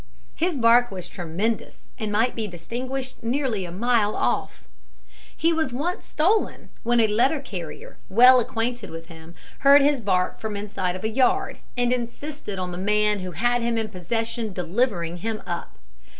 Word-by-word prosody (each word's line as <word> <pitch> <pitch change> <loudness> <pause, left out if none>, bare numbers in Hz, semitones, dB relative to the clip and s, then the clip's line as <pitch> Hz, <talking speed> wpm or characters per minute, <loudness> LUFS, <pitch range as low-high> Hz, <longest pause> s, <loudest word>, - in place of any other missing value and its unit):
His 340 -2 0
bark 240 0 +5
was 185 -2 -7
tremendous, 180 +6 -3
and 215 -1 -2
might 225 +4 +2
be 220 -2 -2
distinguished 250 +10 -5
nearly 235 -4 -1
a 170 - -7
mile 215 +2 +1
off. - - -1 0.7
He 330 +2 +3
was 320 -5 0
once 325 +8 -3
stolen, 385 +8 0
when 240 +1 +2
a 225 - +5
letter 235 +8 +2
carrier, 185 - -8
well 250 +5 +8
acquainted 240 -1 -2
with 165 +1 -9
him, 165 0 -12 0.2
heard 280 +1 +7
his 285 -3 +2
bark 185 -3 0
from 220 -1 -4
the 200 - -3
inside 190 -3 -2
of 185 - -7
a - - +1
yard, 270 - +1 0.2
and 245 0 +2
insisted 250 -2 -5
on 180 -1 -3
the 175 - -5
man 210 +1 +2
who 185 -1 -6
had 240 +8 +1
him 235 0 0
in 220 -1 -1
possession 225 +3 -3
delivering 180 -1 -1
him 220 +4 -4
up. 170 - -5
225 Hz, 170 wpm, -24 LUFS, 185-250 Hz, 0.7 s, well